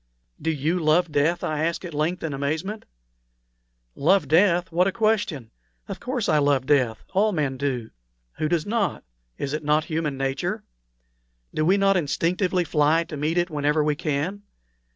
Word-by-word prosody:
"Do 160 Hz, -, -1 dB
you 160 Hz, +3 st, 0 dB
love 160 Hz, +1 st, +2 dB
death?" 150 Hz, +4 st, +1 dB
I 155 Hz, 0 st, -1 dB
asked 170 Hz, +3 st, -2 dB
at 170 Hz, -, -7 dB
length, 160 Hz, +5 st, -1 dB
in 160 Hz, -3 st, -2 dB
amazement. 160 Hz, +10 st, -3 dB, 1.1 s
"Love 165 Hz, +1 st, +2 dB
death? 175 Hz, +3 st, +3 dB
What 180 Hz, +3 st, +3 dB
a -, -, +1 dB
question! 205 Hz, -, 0 dB, 0.4 s
Of -, -, -6 dB
course 250 Hz, -3 st, -2 dB
I 155 Hz, -2 st, +3 dB
love 140 Hz, -3 st, +2 dB
death 130 Hz, -6 st, +1 dB
all 210 Hz, +3 st, +3 dB
men 145 Hz, -7 st, -1 dB
do; 130 Hz, -4 st, -3 dB, 0.5 s
who 155 Hz, -, 0 dB
does 165 Hz, -2 st, 0 dB
not? 210 Hz, -2 st, -1 dB, 0.3 s
Is 140 Hz, -, -3 dB
it 155 Hz, 0 st, -3 dB
not 150 Hz, +1 st, +2 dB
human 155 Hz, -4 st, -2 dB
nature? 135 Hz, 0 st, -2 dB, 0.9 s
Do 155 Hz, -, 0 dB
we 190 Hz, +4 st, +4 dB
not 195 Hz, -1 st, +3 dB
instinctively 180 Hz, +3 st, 0 dB
fly 155 Hz, +1 st, +2 dB
to 160 Hz, -, -8 dB
meet 155 Hz, +4 st, -1 dB
it 175 Hz, 0 st, +1 dB
whenever 150 Hz, +1 st, +1 dB
we 150 Hz, 0 st, +2 dB
can? 155 Hz, +8 st, -2 dB
155 Hz, 170 wpm, -24 LUFS, 145-180 Hz, 1.1 s, we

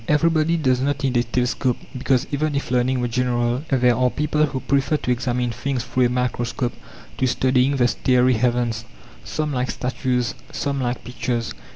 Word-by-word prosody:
Everybody 160 Hz, +2 st, +3 dB
does 130 Hz, -5 st, +1 dB
not 140 Hz, +1 st, -1 dB
need 130 Hz, -2 st, 0 dB
a -, -, +4 dB
telescope, 125 Hz, +1 st, 0 dB, 0.2 s
because, 130 Hz, 0 st, +1 dB
even 150 Hz, +1 st, 0 dB
if 140 Hz, -3 st, -3 dB
learning 125 Hz, +1 st, +2 dB
were 120 Hz, -, 0 dB
general, 120 Hz, +1 st, 0 dB
there 125 Hz, -3 st, +3 dB
are 125 Hz, +1 st, +2 dB
people 150 Hz, +2 st, +1 dB
who 135 Hz, -2 st, -3 dB
prefer 140 Hz, +2 st, +1 dB
to 125 Hz, -, -2 dB
examine 125 Hz, 0 st, 0 dB
things 125 Hz, +1 st, -2 dB
through 125 Hz, 0 st, +2 dB
a -, -, -3 dB
microscope 125 Hz, 0 st, -1 dB, 0.5 s
to 130 Hz, -, +2 dB
studying 130 Hz, +2 st, +2 dB
the 125 Hz, -2 st, +3 dB
starry 125 Hz, +1 st, +3 dB
heavens. 120 Hz, -1 st, 0 dB, 0.4 s
Some 155 Hz, -1 st, -2 dB
like 125 Hz, 0 st, -1 dB
statues, 125 Hz, -3 st, -1 dB, 0.2 s
some 140 Hz, -1 st, -2 dB
like 120 Hz, -1 st, -2 dB
pictures. 120 Hz, -1 st, -3 dB
125 Hz, 175 wpm, -22 LUFS, 125-135 Hz, 0.5 s, a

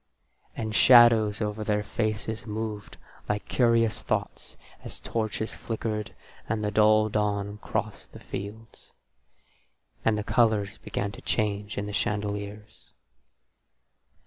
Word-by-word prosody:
And 110 Hz, -1 st, -3 dB
shadows 115 Hz, -4 st, +6 dB
over 105 Hz, 0 st, -2 dB
their 105 Hz, -1 st, 0 dB
faces 110 Hz, 0 st, -2 dB
moved 105 Hz, -1 st, -5 dB, 0.3 s
like 105 Hz, 0 st, -2 dB
curious 115 Hz, -3 st, +2 dB
thoughts -, -, -3 dB, 0.3 s
as -, -, -6 dB
the -, -, -11 dB
torches 110 Hz, -1 st, -2 dB
flickered 110 Hz, -2 st, -4 dB, 0.3 s
and 110 Hz, 0 st, -1 dB
the 105 Hz, -, 0 dB
dull 110 Hz, 0 st, +5 dB
dawn 105 Hz, -1 st, -1 dB
crossed -, -, -4 dB
the -, -, -11 dB
fields. 110 Hz, +3 st, -8 dB, 1.1 s
And 110 Hz, -1 st, +2 dB
the 105 Hz, -, -2 dB
colours 110 Hz, -3 st, +1 dB
began 100 Hz, 0 st, -3 dB
to 100 Hz, -, -11 dB
change 105 Hz, -1 st, -1 dB
in 100 Hz, -, -2 dB
the 105 Hz, -, -6 dB
chandeliers. 105 Hz, 0 st, -3 dB
105 Hz, 120 wpm, -27 LUFS, 105-110 Hz, 1.1 s, shadows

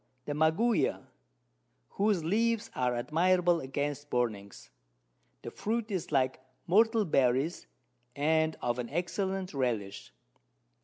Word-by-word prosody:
The 145 Hz, -, -3 dB
Maguey, 160 Hz, +10 st, +2 dB, 0.9 s
whose 200 Hz, -4 st, +1 dB
Leaves 225 Hz, +6 st, 0 dB
are 125 Hz, -1 st, 0 dB
admirable 175 Hz, +6 st, +2 dB
against 145 Hz, +2 st, -3 dB
Burnings; 110 Hz, -5 st, -3 dB, 0.7 s
the -, -, -6 dB
Fruit 220 Hz, 0 st, -3 dB
is 185 Hz, -5 st, -3 dB
like 130 Hz, -2 st, +1 dB, 0.3 s
Myrtle 220 Hz, +3 st, +3 dB
Berries, 135 Hz, +1 st, +1 dB, 0.5 s
and 160 Hz, +2 st, +1 dB
of 120 Hz, 0 st, -1 dB
an 120 Hz, -1 st, -4 dB
excellent 185 Hz, +3 st, -2 dB
Relish. 110 Hz, -, -3 dB
160 Hz, 105 wpm, -30 LUFS, 130-190 Hz, 0.9 s, Myrtle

